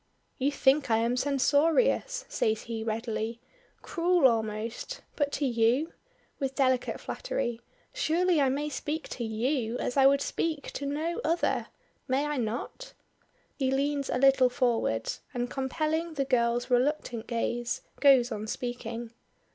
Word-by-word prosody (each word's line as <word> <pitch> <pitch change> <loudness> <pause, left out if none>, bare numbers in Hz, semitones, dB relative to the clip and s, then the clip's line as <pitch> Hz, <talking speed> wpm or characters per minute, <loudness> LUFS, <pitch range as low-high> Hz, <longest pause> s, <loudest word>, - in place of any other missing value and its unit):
"You 275 +2 +2
think 280 0 +3
I 225 - +4
am 230 +2 +1
censorious," 320 - +2
says 220 - 0
he 225 -1 -4
readily, 225 0 -3 0.4
"cruel 345 -3 +3
almost; 225 - -2
but 285 -2 0
to 290 - 0
you" 245 +5 +2 0.5
with 270 -2 -2
delicate 260 -2 +1
flattery 240 - -3 0.3
"surely 360 -7 +2
I 270 - +3
may 285 +3 -1
speak 300 +1 -4
to 240 - -4
you 230 +2 -1
as 250 - -3
I 270 0 +7
would 280 0 +4
speak 310 -4 -2
to 280 - -4
no 310 +4 -2
other. 335 +2 0 0.4
May 265 +3 +1
I 295 -1 -2
not?" 240 - -4 0.7
He 265 -2 +1
leans 280 +1 0
a - - 0
little 265 -1 +5
forward, 235 - 0 0.2
and 245 0 -2
compelling 310 +5 -1
the 275 -2 0
girl's 240 -1 +1
reluctant 245 -2 0
gaze, 240 +1 -2 0.2
goes 260 -3 +5
on 215 -1 -4
speaking. 235 -1 -5
265 Hz, 140 wpm, -29 LUFS, 235-295 Hz, 0.7 s, I